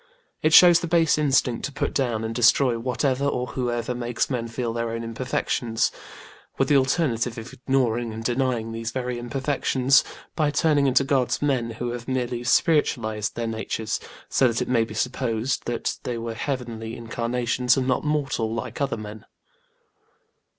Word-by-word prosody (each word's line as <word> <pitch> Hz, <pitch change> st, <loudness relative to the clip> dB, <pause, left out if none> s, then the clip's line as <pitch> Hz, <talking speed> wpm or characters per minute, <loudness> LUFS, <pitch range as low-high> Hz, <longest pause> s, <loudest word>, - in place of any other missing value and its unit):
It 155 Hz, -, +2 dB
shows 175 Hz, +1 st, +8 dB
the 175 Hz, -, -4 dB
base 165 Hz, -2 st, +3 dB
instinct 135 Hz, -5 st, +1 dB
to 140 Hz, -, -4 dB
put 140 Hz, -, -2 dB
down 120 Hz, -5 st, 0 dB
and 110 Hz, 0 st, -3 dB
destroy 120 Hz, +1 st, +4 dB
whatever 130 Hz, +3 st, 0 dB
or 125 Hz, -3 st, 0 dB
whoever 120 Hz, -1 st, -2 dB
makes 120 Hz, +2 st, -2 dB
men 120 Hz, -2 st, -2 dB
feel 115 Hz, 0 st, -3 dB
their 115 Hz, 0 st, -2 dB
own 115 Hz, 0 st, -4 dB
imperfections; 115 Hz, -1 st, -1 dB, 0.7 s
with 135 Hz, -, +1 dB
the 145 Hz, -, +5 dB
alternative 130 Hz, -4 st, +1 dB
of 115 Hz, +2 st, -8 dB
ignoring 120 Hz, -3 st, 0 dB
and 110 Hz, +1 st, -6 dB
denying 120 Hz, -2 st, 0 dB
these 115 Hz, 0 st, -4 dB
very 125 Hz, 0 st, -3 dB
imperfections 135 Hz, +1 st, +2 dB, 0.3 s
by 155 Hz, -2 st, +2 dB
turning 145 Hz, -1 st, +2 dB
into 130 Hz, +1 st, +4 dB
gods 135 Hz, -2 st, +1 dB
men 130 Hz, -5 st, 0 dB
who 120 Hz, +2 st, -4 dB
have 120 Hz, -1 st, -6 dB
merely 125 Hz, -2 st, -2 dB
spiritualised 120 Hz, -, +1 dB
their 120 Hz, -, -2 dB
natures, 110 Hz, -1 st, -3 dB, 0.3 s
so 130 Hz, -, +3 dB
that 115 Hz, -1 st, 0 dB
it 125 Hz, -, -2 dB
may 115 Hz, -3 st, +2 dB
be 110 Hz, -, -9 dB
supposed 125 Hz, 0 st, -1 dB
that 120 Hz, -1 st, -2 dB
they 120 Hz, -1 st, -3 dB
were 115 Hz, 0 st, -4 dB
heavenly 115 Hz, -3 st, -4 dB
incarnations 120 Hz, +2 st, 0 dB
and 130 Hz, -1 st, 0 dB
not 130 Hz, -, +1 dB
mortal 140 Hz, -7 st, -1 dB
like 115 Hz, +3 st, -5 dB
other 140 Hz, -, 0 dB
men. 110 Hz, 0 st, -8 dB
125 Hz, 165 wpm, -24 LUFS, 115-135 Hz, 0.7 s, shows